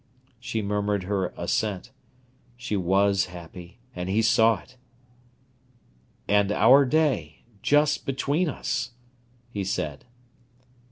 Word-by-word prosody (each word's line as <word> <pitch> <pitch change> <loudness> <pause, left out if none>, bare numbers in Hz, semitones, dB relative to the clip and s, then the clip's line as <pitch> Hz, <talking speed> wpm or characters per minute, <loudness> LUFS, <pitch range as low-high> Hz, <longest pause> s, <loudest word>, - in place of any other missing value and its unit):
She 110 -3 -3
murmured 105 -1 -1
her 95 -1 -1
assent. 105 +2 -2 0.7
She 125 -3 -3
was 95 +1 +2
happy, 90 +1 -11 0.2
and 90 +1 -4
he 110 +4 +2
saw 110 -2 +4
it. 130 +6 -20 1.5
"And 100 0 +3
our 135 +6 +6
day—just 145 - 0
between 140 +6 0
us," 125 -3 -3 0.6
he 100 -3 -3
said. 75 -6 -3
105 Hz, 100 wpm, -25 LUFS, 95-125 Hz, 1.5 s, our